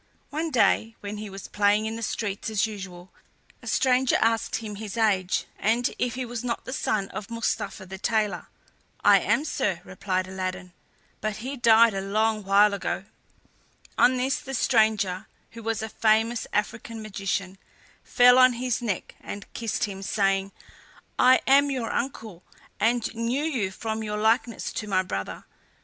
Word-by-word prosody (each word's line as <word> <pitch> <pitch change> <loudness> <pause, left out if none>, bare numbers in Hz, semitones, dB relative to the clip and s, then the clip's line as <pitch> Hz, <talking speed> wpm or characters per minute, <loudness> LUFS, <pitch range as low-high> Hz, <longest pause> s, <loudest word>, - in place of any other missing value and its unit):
One 320 +3 -2
day, 225 -4 +2
when 205 +1 -5
he 210 0 -6
was 195 -1 -8
playing 210 +1 +2
in 220 +1 -3
the 230 - -6
streets 205 -2 -3
as 215 -1 +1
usual, 190 -4 -8 0.5
a - - -12
stranger 260 -1 +3
asked 225 0 +1
him 215 -2 -5
his 215 0 -6
age, 190 -4 +1
and 235 +3 +1
if 245 -1 -1
he 255 0 -3
was 240 -1 -5
not 235 -2 -3
the 255 - -5
son 210 -6 -1
of 205 - -7
Mustapha 215 -4 -3
the 190 +1 -9
tailor. 215 -1 0 0.6
"I - - +7
am, 295 - +1
sir," 190 - -1
replied 185 0 -2
Aladdin; 185 -1 -5 0.5
"but 215 0 -2
he 255 +6 -5
died 230 -2 +5
a 195 - -2
long 215 +2 0
while 200 +1 +5
ago." 200 - -3 0.9
On 255 +1 +4
this 260 +2 0
the 270 0 -6
stranger, 215 -4 +2 0.2
who 230 - -10
was 225 0 -2
a 220 - -4
famous 225 +2 +1
African 220 +1 -3
magician, 195 -2 -3 0.4
fell 250 0 +6
on 255 -1 +7
his 245 0 -2
neck 210 -6 -3
and 205 -1 -7
kissed 230 -2 -2
him 195 -2 -3
saying: 195 -1 0 0.7
"I 255 +1 +6
am 280 +1 +5
your 255 -4 -2
uncle, 220 -8 -4 0.4
and 235 +1 +1
knew 235 +5 -1
you 255 -12 -1
from 220 +3 -4
your 210 -1 -3
likeness 225 +2 0
to 215 - -4
my 185 -2 +2
brother. 100 - -5
220 Hz, 165 wpm, -26 LUFS, 195-235 Hz, 0.9 s, I